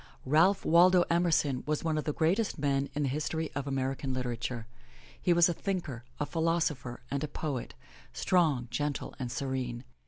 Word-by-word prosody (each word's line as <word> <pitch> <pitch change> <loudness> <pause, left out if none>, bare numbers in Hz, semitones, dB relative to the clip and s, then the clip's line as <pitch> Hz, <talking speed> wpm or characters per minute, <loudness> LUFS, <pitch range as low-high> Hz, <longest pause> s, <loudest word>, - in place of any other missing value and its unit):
Ralph 165 +8 +4
Waldo 175 +2 +6
Emerson 160 -6 +2
was 150 0 0
one 160 -1 0
of 155 - -2
the 150 - 0
greatest 175 +9 +1
men 140 -1 0
in 150 - 0
the 135 - +1
history 155 +3 -2
of 145 0 -3
American 135 -1 -2
literature. 120 -2 -3 0.6
He 180 - +2
was 170 -1 +6
a 175 - 0
thinker, 170 - -3 0.2
a 150 - 0
philosopher 160 -7 -1
and 140 +1 -1
a - - -1
poet, 145 -4 -4 0.4
strong, 155 -9 +2
gentle 145 -1 -2
and 125 -2 -3
serene. 125 -3 -3
145 Hz, 165 wpm, -30 LUFS, 130-165 Hz, 0.6 s, Waldo